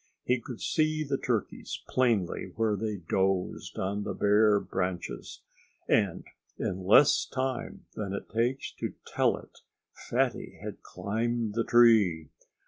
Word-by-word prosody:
He 125 0 +1
could 120 -2 -8
see 155 0 +1
the 135 -2 -2
turkeys 115 -6 -3
plainly 105 -7 0
where 110 -2 +1
they 105 0 -2
dozed 95 -1 0
on 100 +2 -1
the - - -4
bare 105 0 +4
branches. 90 -2 -4 0.4
And 100 -6 +2 0.3
in 95 +1 -3
less 140 +9 +6
time 130 0 -3
than 100 -3 -4
it 100 - -5
takes 120 +4 -1
to - - -3
tell - - +1
it - - -15 0.3
Fatty - - -2
had - - -7
climbed 115 +1 -2
the 115 +1 +1
tree. 105 - +4
110 Hz, 135 wpm, -29 LUFS, 95-120 Hz, 0.4 s, less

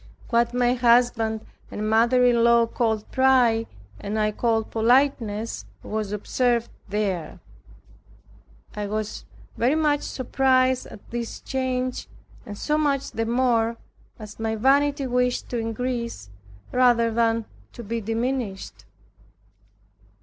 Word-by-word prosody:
What 235 0 +3
my 245 0 +2
husband 235 -2 +2 0.2
and 210 +1 -4
mother 235 +3 +4
in 235 -1 +4
law 235 0 +5
called 225 -2 -2
pride, 250 -4 +3 0.3
and 205 +2 -4
I 215 0 +1
called 225 0 -1
politeness, 230 -2 +1 0.2
was 215 -2 -3
observed 235 +3 0 0.2
there. 195 -6 -2 1.4
I 210 -1 -3
was 215 +1 -4 0.3
very 250 +6 +2
much 300 -2 +2
surprised 260 0 +1
at 200 - -13
this 235 -1 -4
change, 255 -1 -3 0.4
and 205 -1 -7
so 300 +6 0
much 280 -2 0
the 225 0 -2
more, 235 -1 +1 0.4
as 215 -1 -11
my 220 0 -1
vanity 280 +4 +2
wished 250 0 0
to 240 - -2
increase, 230 - -4 0.4
rather 240 -2 +3
than 230 0 +1 0.3
to 235 - -9
be 230 +2 -3
diminished. 225 -2 -3
235 Hz, 120 wpm, -24 LUFS, 220-255 Hz, 1.4 s, law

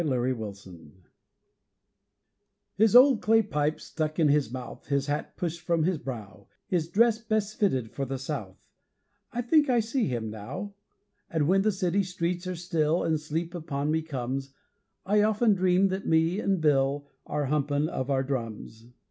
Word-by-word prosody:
_ - - -1
Corny 130 -4 +1 0.6
Bill 95 +6 -24 1.7
His 220 +2 +3
old 255 -1 +7
clay 225 +1 +4
pipe 150 -2 -1
stuck 155 -2 -4
in 160 -3 +4
his 145 -5 +2
mouth, 130 -1 -8
His 140 -1 0
hat 145 +1 -3
pushed 170 -1 -3
from 165 -1 +1
his 175 -1 0
brow, 110 -7 -8 0.2
His 170 -4 -1
dress 230 +3 +3
best 215 -2 -2
fitted 130 - +1
for 135 - -3
the 135 +1 -4
South 130 -9 -5 0.7
I 245 +1 -2
think 295 +3 +3
I 245 -2 +4
see 225 0 0
him 115 -3 -3
now; 180 - -6 0.6
And 155 -3 0
when 195 +3 +4
the 215 +2 +2
city 185 0 0
streets 180 -1 -3
are 185 - -3
still, 165 -1 0
And 160 -1 +1
sleep 160 +3 -4
upon 150 -3 -2
me 160 0 +1
comes, 135 -2 -4 0.5
I 210 +2 +3
often 215 +1 +3
dream 185 0 +3
that 190 +1 -3
me 165 +5 +2
an' 195 -3 0
Bill 140 -1 +2 0.2
Are 150 -1 -1
humpin' 145 +1 0
of 130 -4 -4
our 135 -1 +1
drums. 115 -3 -5
160 Hz, 170 wpm, -27 LUFS, 135-195 Hz, 1.7 s, old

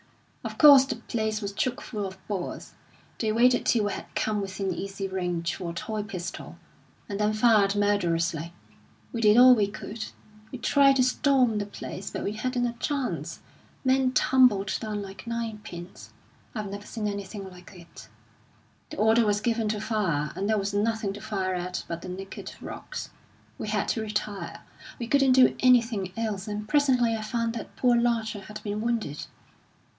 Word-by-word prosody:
Of - - -6
course, 285 -3 +9
the - - -3
place 220 -1 -2
was 200 0 -3
chock 240 +4 -1
full 210 -4 -4
of 190 0 -10
Boers; 195 -4 -5 0.5
they 220 -2 +1
waited 245 +3 +4
till 220 -4 +3
we 205 - -1
had - - -7
come 210 -1 0
within 195 -1 -3
easy 195 +2 -4
range 175 -3 -2
for 175 - -5
a - - -5
toy 215 +5 -3
pistol, 190 -4 -7 0.5
and 200 -1 -4
then 210 0 +2
fired 215 -3 +4
murderously. 170 -5 0 0.6
We 230 - -2
did 210 0 +6
all 255 +1 +9
we 210 -4 +2
could. 215 +2 -6 0.5
We 255 - -5
tried 275 +2 +4
to 260 - +4
storm 255 -3 +2
the 205 - -3
place, 200 -1 -7
but - - -5
we 200 - -1
hadn't 245 +3 -1
a 240 - -1
chance. 275 +2 -3 0.4
Men 260 0 +3
tumbled 240 -9 +4
down 210 -2 -4
like 195 +2 -10
nine 230 -2 -3
pins. 175 -3 -10 0.4
I've 210 -3 -4
never 205 +1 -7
seen 220 -2 -3
anything 200 0 -5
like 180 -1 -13
it. 170 -1 -13 0.8
The 310 - -8
order 220 +2 +4
was 205 0 +2
given 225 -1 0
to 210 0 -1
fire, 185 -9 -1
and 200 +2 -2
there 220 - +3
was 200 0 -2
nothing 215 0 0
to 205 - -9
fire 190 -3 -2
at 180 0 -3
but 170 0 -5
the 185 - -7
naked 190 +1 -7
rocks. - - -7 0.5
We - - -4
had 210 -1 0
to 225 - 0
retire 210 -2 -4 0.4
we 235 - -4
couldn't 270 +1 +4
do 255 -1 +6
anything 230 -7 +3
else; 215 -3 -2
and 210 0 -4
presently 255 -4 +3
I 220 - -4
found 230 +1 -1
that 230 - -7
poor 245 -2 +3
Larcher 230 -3 0
had 210 +2 -9
been 210 0 -3
wounded. 225 -11 -2
215 Hz, 180 wpm, -27 LUFS, 195-235 Hz, 0.8 s, course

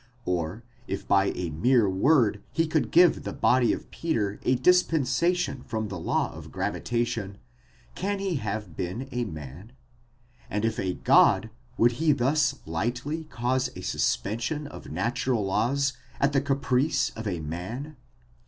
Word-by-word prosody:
or 90 +4 -2 0.2
if 95 - -4
by 95 -1 +4
a 85 -3 -3
mere 115 - +3
word 105 +1 +3
he 165 - +1
could 155 -7 0
give 175 0 +5
the - - -5
body 125 -1 +3
of - - -5
Peter 110 -12 -1
a 130 - +2
dispensation 165 -1 +2
from 110 -3 -4
the 95 -2 -5
law - - 0
of - - -10
gravita 120 0 -1
tion, 100 -4 -5 0.6
can 200 +2 -2
he 195 -4 -1
have 105 - -4
been 95 - -4
a 125 -1 -1
man? 80 - -9 0.8
and 105 +2 -1
if 115 - -1
a 95 -1 -1
God, 110 - +4 0.3
would 120 +1 +5
he 160 -2 +5
thus 140 +2 +1
lightly 120 - -2
cause 130 -2 -1
a 90 - -7
suspension 115 - -1
of 145 - -10
natural 120 - -1
laws 135 +8 +1 0.3
at 140 +1 +2
the 135 - +3
caprice 140 +1 +1
of 110 -1 -6
a 90 -4 -2
man? 95 - -5
120 Hz, 155 wpm, -27 LUFS, 100-140 Hz, 0.8 s, give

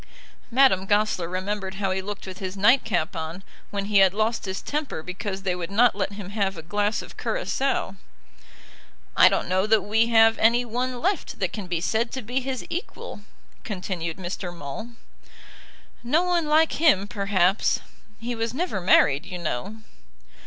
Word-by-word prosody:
Madame 245 -7 +4
Goesler 205 -4 +1
remembered 190 +1 -3
how 195 -1 -1
he 190 0 -1
looked 205 +1 -6
with 185 -1 -8
his 190 0 -5
nightcap 210 - +3
on, 165 +3 -5 0.3
when 200 -1 -3
he 205 -1 +3
had 190 0 +5
lost 220 +1 0
his 190 0 -3
temper 290 - -4
because 190 +2 -5
they 185 -2 0
would 175 -1 -5
not 230 +4 +4
let 200 0 -2
him 200 -1 -8
have 200 -3 -1
a 160 - -8
glass 205 +4 -1
of - - -13
curaçoa. 275 - -1 1.2
"I - - +8
don't - - -1
know 185 +3 +1
that 215 -2 +4
we 220 +3 +2
have 225 -1 +5
any 235 +2 +4
one 245 +2 -2
left 375 +4 -1
that 190 -2 -2
can 205 -4 -5
be 175 -2 -2
said 225 +5 0
to 260 - -4
be 245 +5 -1
his 260 -1 -4
equal," 340 - -6 0.4
continued 180 -4 -4
Mr. 180 0 -5
Maule. 175 +9 -7 1.1
"No 300 +9 +2
one 350 -3 +1
like 310 +1 +3
him, 230 - +4
perhaps. 200 -3 +1 0.4
He 240 +2 -3
was 230 +1 -3
never 325 - -2
married, 145 -5 +4
you 185 -2 -5
know." 175 - -4
205 Hz, 170 wpm, -25 LUFS, 185-235 Hz, 1.2 s, I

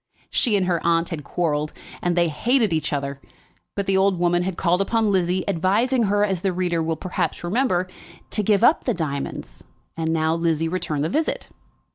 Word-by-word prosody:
She 220 -4 +2
and 190 - +1
her 175 -2 0
aunt 165 0 +2
had 160 -4 -5
quarrelled, 150 -1 -1 0.3
and 175 -1 0
they 170 -1 +3
hated 220 - +1
each 155 - -1
other; 140 -1 -3 0.5
but 200 - -1
the 195 0 +2
old 190 -1 +3
woman 175 0 +2
had 185 0 -3
called 180 +1 +2
upon 220 +1 +1
Lizzie, 185 -1 +1
advising 210 +7 +2
her, 205 +1 +2
as 190 -4 -2
the 195 - +1
reader 175 -2 0
will 160 0 -1
perhaps 180 +2 -3
remember, 185 -1 +1 0.4
to 215 - 0
give 205 0 +2
up 310 - +4
the 245 - +1
diamonds, 140 - -5 0.3
and 160 0 -1
now 160 0 +1
Lizzie 165 -1 0
returned 160 -4 -2
the 155 - 0
visit. 310 - -1
175 Hz, 190 wpm, -23 LUFS, 165-200 Hz, 0.5 s, up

